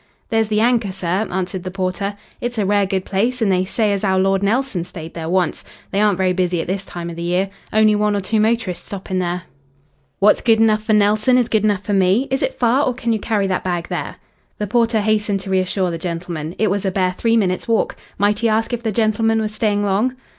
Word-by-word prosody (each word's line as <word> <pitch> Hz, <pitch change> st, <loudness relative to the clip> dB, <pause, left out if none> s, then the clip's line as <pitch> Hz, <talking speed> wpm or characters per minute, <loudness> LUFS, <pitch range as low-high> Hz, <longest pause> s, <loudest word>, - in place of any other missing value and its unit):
"There's 225 Hz, -1 st, +2 dB
the 215 Hz, 0 st, +1 dB
Anchor, 230 Hz, -4 st, +2 dB
sir," 185 Hz, +3 st, -1 dB
answered 185 Hz, 0 st, -2 dB
the 185 Hz, -, -5 dB
porter. 190 Hz, +2 st, -3 dB, 0.3 s
"It's 240 Hz, 0 st, -3 dB
a 210 Hz, -, +1 dB
rare 200 Hz, 0 st, +2 dB
good 190 Hz, -1 st, -2 dB
place, 230 Hz, +6 st, 0 dB
an' 220 Hz, -4 st, +1 dB
they 185 Hz, -1 st, +2 dB
say 210 Hz, +1 st, 0 dB
as 200 Hz, -, -3 dB
'ow 190 Hz, -2 st, +2 dB
Lord 195 Hz, +1 st, +2 dB
Nelson 215 Hz, -2 st, 0 dB
stayed 165 Hz, -2 st, -8 dB
there 165 Hz, -1 st, -5 dB
once. 185 Hz, 0 st, 0 dB, 0.3 s
They 200 Hz, -, +1 dB
aren't 210 Hz, -3 st, +3 dB
very 185 Hz, -1 st, +1 dB
busy 180 Hz, -1 st, 0 dB
at -, -, -2 dB
this 190 Hz, +2 st, -2 dB
time 170 Hz, -3 st, -6 dB
of -, -, -8 dB
the 170 Hz, -, -6 dB
year. 180 Hz, +3 st, 0 dB, 0.2 s
Only 215 Hz, 0 st, +4 dB
one 210 Hz, 0 st, +1 dB
or -, -, +1 dB
two 215 Hz, +3 st, 0 dB
motorists 220 Hz, -4 st, 0 dB
stopping 190 Hz, -1 st, -4 dB
there." 180 Hz, 0 st, -2 dB, 0.7 s
"What's 210 Hz, +2 st, +4 dB
good 225 Hz, -2 st, +3 dB
enough 215 Hz, -1 st, +3 dB
for 220 Hz, -, +2 dB
Nelson 215 Hz, +4 st, +3 dB
is 245 Hz, -2 st, +1 dB
good 220 Hz, -3 st, +1 dB
enough 205 Hz, -2 st, +1 dB
for 205 Hz, -, -2 dB
me. 195 Hz, +7 st, +3 dB
Is 265 Hz, -, 0 dB
it -, -, -1 dB
far, 250 Hz, +4 st, +3 dB
or 250 Hz, -, -1 dB
can 235 Hz, -2 st, -1 dB
you 220 Hz, -, -1 dB
carry 205 Hz, -2 st, 0 dB
that 190 Hz, -1 st, -1 dB
bag 175 Hz, -2 st, -2 dB
there?" -, -, -4 dB, 0.4 s
The 210 Hz, -, -2 dB
porter 230 Hz, 0 st, +2 dB
hastened 210 Hz, -2 st, +1 dB
to 195 Hz, -, -6 dB
reassure 185 Hz, -1 st, 0 dB
the 165 Hz, -, -4 dB
gentleman. 170 Hz, -1 st, -5 dB
It 215 Hz, -2 st, +1 dB
was 200 Hz, 0 st, -1 dB
a 195 Hz, -, +1 dB
bare 185 Hz, -1 st, +1 dB
three 230 Hz, +4 st, +1 dB
minutes' 185 Hz, -4 st, 0 dB
walk. 230 Hz, -1 st, +1 dB, 0.2 s
Might 205 Hz, +1 st, +2 dB
he 230 Hz, -, +2 dB
ask 225 Hz, +2 st, 0 dB
if 240 Hz, -, -2 dB
the 225 Hz, -2 st, -1 dB
gentleman 225 Hz, +1 st, +1 dB
was 215 Hz, -1 st, -2 dB
staying 210 Hz, -2 st, 0 dB
long? 205 Hz, +6 st, +1 dB
205 Hz, 240 wpm, -19 LUFS, 185-220 Hz, 0.7 s, Only